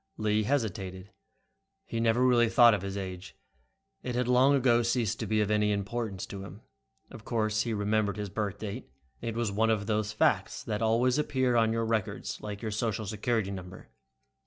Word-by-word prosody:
Lee 110 0 +1
hesitated. 100 -6 -2 0.7
He 115 - -4
never 115 +2 +3
really 120 -2 +4
thought 120 -1 +7
of 105 - -1
his 100 +1 -4
age. 95 -1 -7 0.7
It 125 - -4
had 125 0 0
long 130 +3 +5
ago 120 -3 +3
ceased 115 -2 0
to - - -3
be 110 0 +2
of 105 0 0
any 105 0 +2
importance 100 -1 -3
to 95 -1 -8
him. 100 +2 -11 0.5
Of 110 - -11
course 110 -2 0
he 115 0 -2
remembered 105 0 0
his 105 -1 -4
birth 105 -1 -2
date. 105 -3 -6 0.3
It 115 -1 -4
was 115 -3 -1
one 110 +3 +1
of 105 -2 +1
those 105 -1 -1
facts 105 - +1
that 105 0 -3
always 120 +4 +2
appears 130 -4 +1
on 115 -1 +3
your 115 0 0
records, 110 -3 -2
like 105 +1 -6
your 110 - -2
social 110 0 -2
security 105 0 -1
number. 95 -1 -9
110 Hz, 185 wpm, -29 LUFS, 100-115 Hz, 0.7 s, thought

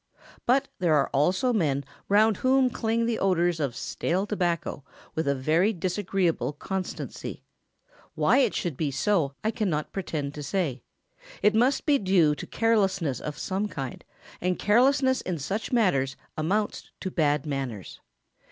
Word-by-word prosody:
But 270 +3 +3
there 170 -4 +3
are 140 -2 +2
also 185 - +2
men 145 -9 +1 0.3
round 210 0 +4
whom 260 0 +3
cling 230 0 0
the 230 -1 -1
odours 175 -3 +2
of 135 -5 -1
stale 180 +9 -1
tobacco 175 -8 -2 0.3
with 160 -2 -2
a 140 - +2
very 160 +10 +2
disagreeable 185 -3 -1
constancy. 190 +5 -5 0.7
Why - - +4
it 250 -6 +2
should 170 -5 -2
be 155 - 0
so 145 -2 +1
I 220 - +1
cannot 175 -9 -2
pretend 155 -7 -3
to 150 - -7
say. 145 -6 -2 0.6
It 210 - +5
must 245 +5 +2
be 290 -3 +4
due 185 -6 +3
to - - -7
carelessness 195 - +1
of 150 -1 -6
some 195 +5 -2
kind, 135 -10 -6 0.4
and 180 0 0
carelessness 260 +4 +3
in 180 -2 -3
such 195 +10 -3
matters 140 - +2 0.2
amounts 200 +7 -1
to 190 - -3
bad 150 -3 +1
manners. 135 - -4
185 Hz, 150 wpm, -27 LUFS, 150-215 Hz, 0.7 s, It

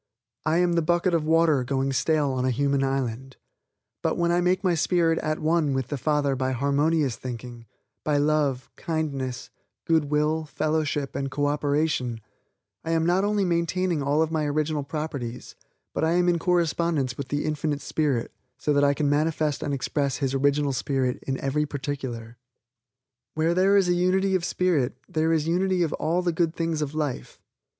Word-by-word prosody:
I 160 +1 +3
am 175 0 +2
the 170 - +2
bucket 175 +3 +1
of 165 -2 +1
water 160 -4 +3
going 135 +1 -1
stale 150 +1 +1
on 130 -1 -1
a 130 - +2
human 140 +2 +1
island; 135 -1 -2 0.6
but, - - 0
when 170 0 +2
I 175 +1 +2
make 185 +2 +1
my 185 -2 +3
spirit 165 0 +2
at 155 0 -1
one 155 -3 +1
with 130 -2 -2
the 145 - -2
Father 145 0 +1
by 130 0 -1
harmonious 140 +1 +1
thinking, 120 -2 -8 0.4
by 150 -1 +1
love, 145 -3 +1
kindness, 140 -6 -3 0.3
good 160 -2 +3
will, 150 +2 0
fellowship 150 -2 -1
and 135 0 -2
co 145 +2 -1
operation, 145 -4 0 0.6
I 165 - -1
am 165 0 +2
not 180 +3 +2
only 205 -1 +1
maintaining 170 -1 0
all 145 +3 +2
of 160 - -3
my 155 -2 0
original 150 +1 0
properties, 140 -5 -5 0.4
but - - -1
I 160 +1 +2
am 180 0 +2
in 175 -1 +2
correspondence 165 -6 +1
with 140 0 -5
the 145 0 -2
Infinite 150 -1 -1
Spirit 140 -7 -1 0.3
so 150 - 0
that 145 0 +3
I 140 0 +3
can 150 -1 0
manifest 150 0 +1
and 145 - -2
express 140 0 -1
His 135 -2 -1
original 140 +1 +2
spirit 130 -1 -1
in 135 -1 -1
every 150 +2 0
particular. 130 -5 -5 1.0
Where 160 +2 +2
there 190 +3 +4
is 195 -2 +3
a 175 - +3
unity 185 +2 +2
of 185 -2 +1
spirit, 155 -10 0
there 160 +1 0
is 160 -2 +1
unity 180 +1 +1
of 160 - -1
all 170 +3 0
the 175 -1 0
good 165 0 0
things 165 -2 -1
of 150 0 -3
life. 145 - -3
150 Hz, 180 wpm, -25 LUFS, 135-165 Hz, 1.0 s, there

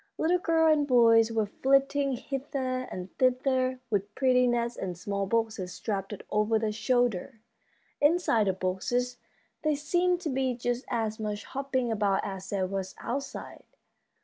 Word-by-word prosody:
Little 350 +3 +2
girls 325 -2 +4
and 290 -1 0
boys 230 -3 +5
were 220 -1 +1
flitting 275 +4 +2
hither 260 0 -3
and 180 +1 -7
thither 255 0 +2
with 205 0 -1
pretty 250 -2 +3
nets 235 0 0
and 180 -3 -5
small 200 +2 -2
boxes 220 -4 -1
strapped 195 -2 -3 0.2
over 215 +1 +2
their 220 -1 -1
shoulders. 245 0 0 0.7
Inside 290 - +3
the 190 - +2
boxes 245 +7 -1 0.4
there 305 -1 +1
seemed 350 +5 +1
to 330 - -2
be 260 -1 0
just 245 +1 -2
as 220 -2 -1
much 210 -1 -3
hopping 265 -3 -2
about 205 -3 +1
as 190 -1 -6
there 195 -2 0
was 190 0 -4
outside. 275 +3 -5
245 Hz, 145 wpm, -28 LUFS, 210-270 Hz, 0.7 s, boys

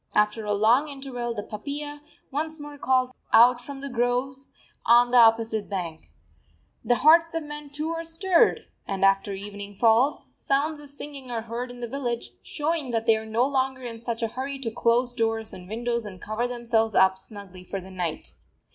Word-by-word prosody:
After 210 +1 +2
a 210 - 0
long 235 +8 +4
interval 260 -4 -5
the 205 - -4
papiya 290 +7 -6 0.3
once 315 +3 -3
more 290 -1 -9
calls 255 -1 +2 0.2
out 245 +2 +6
from 270 +2 -8
the 280 - -5
groves 255 +2 -1 0.3
on 240 +1 +5
the 250 - +6
opposite 225 -2 +4
bank. 170 -5 -4 0.8
The 245 - +3
hearts 330 +1 +6
of 330 - -1
men 295 -1 -8
too 300 +3 -4
are 330 0 -3
stirred; 335 +2 +2 0.3
and 195 -1 +1
after 195 +1 +2
evening 205 +1 -7
falls, 235 +7 +3
sounds 295 +3 0
of 290 -1 -5
singing 280 -2 -7
are 230 -2 -3
heard 235 +2 -5
in 245 0 -10
the 240 - -3
village, 240 -2 -3
showing 305 -2 -2
that 225 -1 -1
they 225 -1 +5
are 220 0 -5
no 225 +3 +2
longer 265 -1 -1
in 230 -2 -6
such 235 0 -4
a 225 - 0
hurry 270 +4 -4
to 230 -4 -2
close 240 +2 +2
doors 225 -1 -1
and 180 0 -10
windows 235 +1 -2
and 195 -4 -9
cover 215 +5 -2
themselves 235 -3 0
up 190 0 +5
snugly 190 -2 -10
for 195 +2 -5
the 190 +1 -11
night. 175 -4 -4
240 Hz, 190 wpm, -26 LUFS, 220-275 Hz, 0.8 s, out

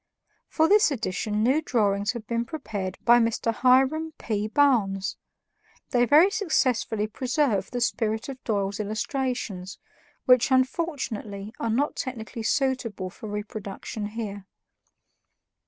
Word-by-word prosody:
For 320 0 +2
this 415 +2 +5
edition 215 -4 -2
new 265 +6 +3
drawings 205 -6 +1
have 235 -2 -7
been 235 +1 -1
prepared 205 - -5
by 240 0 +7
Mr. 230 0 0
Hiram 265 +7 +3
P. 210 -2 -2
Barnes. 215 -7 +2 0.8
They 245 -2 +4
very 310 +9 +6
successfully 260 - +1
preserve 245 -2 0
the 245 - -4
spirit 220 -2 0
of 265 -2 -8
Doyle's 200 -2 -1
illustrations, 215 -3 -3 0.5
which 250 -1 +5
unfortunately 255 - -1
are 230 - -1
not 270 +7 0
technically 230 -3 -5
suitable 230 -7 -1
for 215 - -9
reproduction 210 0 -5
here. 205 -3 -6
230 Hz, 120 wpm, -26 LUFS, 210-265 Hz, 0.8 s, by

